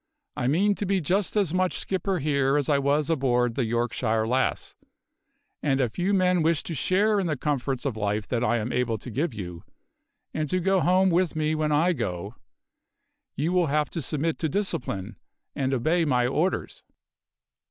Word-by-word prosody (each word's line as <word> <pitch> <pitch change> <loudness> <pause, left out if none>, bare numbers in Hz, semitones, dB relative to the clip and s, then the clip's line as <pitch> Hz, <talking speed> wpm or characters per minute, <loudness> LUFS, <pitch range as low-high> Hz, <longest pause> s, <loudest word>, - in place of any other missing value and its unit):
I 125 - -1
mean 190 +9 +3
to - - 0
be 195 0 +2
just 185 +6 0
as 195 -6 +1
much 185 0 +1
skipper 190 0 -1
here 140 -2 +1
as 145 -1 0
I 145 -2 +3
was 140 +1 +1
aboard 125 -6 +1
the 125 0 -1
Yorkshire 115 -1 0
Lass; 130 +2 0 0.9
and 135 -2 +1
if 125 0 -1
you 185 +3 +1
men 185 -3 +3
wish 160 -1 +1
to 170 - -5
share 200 +8 +2
in 190 - -1
the 155 -3 -1
comforts 135 -2 -2
of 135 -5 -1
life 105 0 -2
that 120 -1 0
I 120 0 +2
am 115 +2 -3
able 125 -3 0
to 120 +4 -9
give 150 +8 -1
you, 90 -6 -7 0.7
and 155 -2 -2
to 185 - +1
go 190 +2 +2
home 185 +3 +3
with 175 -1 +1
me 155 0 0
when 155 -1 0
I 165 +5 +3
go, 90 - -4 1.0
you 155 +5 -1
will 180 -2 +3
have 150 +1 0
to 165 - -3
submit 155 +3 -2
to 160 - 0
discipline, 115 - -2 0.4
and 135 -1 -1
obey 155 +7 +1
my 125 -5 +2
orders." 155 +9 -1
150 Hz, 185 wpm, -26 LUFS, 125-175 Hz, 1.0 s, mean